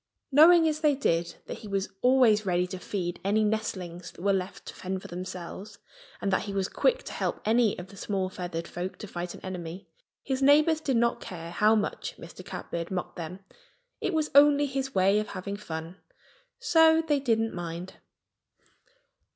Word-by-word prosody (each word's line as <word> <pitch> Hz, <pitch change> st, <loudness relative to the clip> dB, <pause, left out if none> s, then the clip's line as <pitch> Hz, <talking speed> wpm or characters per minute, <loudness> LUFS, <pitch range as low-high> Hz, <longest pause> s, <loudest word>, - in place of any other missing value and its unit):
Knowing 325 Hz, +4 st, +7 dB
as 310 Hz, -1 st, 0 dB
they 300 Hz, -2 st, +3 dB
did 170 Hz, -10 st, 0 dB
that -, -, -7 dB
he 215 Hz, -, -10 dB
was 195 Hz, -1 st, -1 dB
always 250 Hz, -4 st, +5 dB
ready 180 Hz, -2 st, +1 dB
to 180 Hz, 0 st, -7 dB
feed 180 Hz, -2 st, -4 dB
any 210 Hz, +3 st, +2 dB
nestlings 185 Hz, -5 st, -3 dB
that -, -, -14 dB
were 200 Hz, 0 st, +3 dB
left 190 Hz, 0 st, -3 dB
to -, -, -8 dB
fend 190 Hz, 0 st, -4 dB
for -, -, -10 dB
themselves, 185 Hz, +3 st, -7 dB, 0.4 s
and 195 Hz, -1 st, -1 dB
that -, -, +2 dB
he 200 Hz, -, -5 dB
was 190 Hz, -1 st, 0 dB
quick -, -, +1 dB
to -, -, -7 dB
help -, -, -2 dB
any 225 Hz, 0 st, +3 dB
of 180 Hz, +2 st, -8 dB
the 200 Hz, -, -13 dB
small 195 Hz, -1 st, -2 dB
feathered 175 Hz, -2 st, -5 dB
folk 180 Hz, +2 st, -5 dB
to -, -, -7 dB
fight 175 Hz, -3 st, -5 dB
an -, -, -11 dB
enemy, 180 Hz, 0 st, -7 dB, 0.4 s
his 265 Hz, -1 st, -2 dB
neighbors 305 Hz, +3 st, +5 dB
did 270 Hz, -5 st, +1 dB
not 235 Hz, 0 st, +1 dB
care 170 Hz, -2 st, -7 dB
how 210 Hz, +5 st, +4 dB
much -, -, -2 dB
Mr. -, -, -11 dB
Catbird 170 Hz, 0 st, -5 dB
mocked 185 Hz, -2 st, -4 dB
them. 180 Hz, +2 st, -7 dB, 0.6 s
It 375 Hz, -, -1 dB
was 310 Hz, -1 st, 0 dB
only 290 Hz, +1 st, +6 dB
his 270 Hz, -1 st, -3 dB
way 195 Hz, +2 st, +4 dB
of 215 Hz, -, -3 dB
having 200 Hz, +1 st, -5 dB
fun; 165 Hz, -3 st, -7 dB, 0.6 s
so 320 Hz, -1 st, +5 dB
they 295 Hz, -2 st, +2 dB
didn't 225 Hz, -4 st, +1 dB
mind. 175 Hz, +1 st, -6 dB
200 Hz, 185 wpm, -28 LUFS, 180-265 Hz, 0.6 s, Knowing